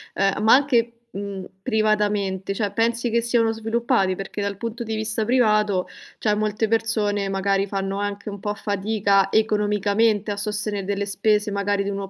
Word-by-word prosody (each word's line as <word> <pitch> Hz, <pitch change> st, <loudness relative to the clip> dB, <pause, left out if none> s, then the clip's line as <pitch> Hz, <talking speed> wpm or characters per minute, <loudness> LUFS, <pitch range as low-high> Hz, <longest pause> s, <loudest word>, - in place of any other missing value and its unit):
ehm, 195 Hz, +1 st, +1 dB
ma 220 Hz, -, +6 dB
anche, 245 Hz, -4 st, +3 dB, 0.2 s
mhmm, 195 Hz, -1 st, -6 dB, 0.2 s
privatamente, 210 Hz, -3 st, 0 dB
cioè 205 Hz, 0 st, -2 dB
pensi 235 Hz, +2 st, 0 dB
che 235 Hz, +1 st, +2 dB
siano 230 Hz, -1 st, +2 dB
sviluppati? 225 Hz, -3 st, 0 dB
Perché 195 Hz, +2 st, -6 dB
dal 200 Hz, -1 st, -3 dB
punto 230 Hz, +2 st, -5 dB
di 220 Hz, -1 st, -3 dB
vista 220 Hz, 0 st, -1 dB
privato 215 Hz, -5 st, +2 dB, 0.3 s
cioè 210 Hz, -1 st, +1 dB
molte 215 Hz, +1 st, 0 dB
persone 215 Hz, -3 st, 0 dB
magari 195 Hz, 0 st, 0 dB
fanno 195 Hz, 0 st, -3 dB
anche 205 Hz, +1 st, -4 dB
un 200 Hz, -1 st, -7 dB
po' 205 Hz, 0 st, -2 dB
fatica 200 Hz, -1 st, +1 dB
economicamente 210 Hz, 0 st, +1 dB
a 200 Hz, -, -3 dB
sostenere 210 Hz, 0 st, -2 dB
delle 200 Hz, +1 st, -1 dB
spese 210 Hz, +1 st, +1 dB
magari 200 Hz, 0 st, 0 dB
di 200 Hz, -, -3 dB
uno 195 Hz, -1 st, -4 dB
210 Hz, 165 wpm, -23 LUFS, 200-220 Hz, 0.3 s, ma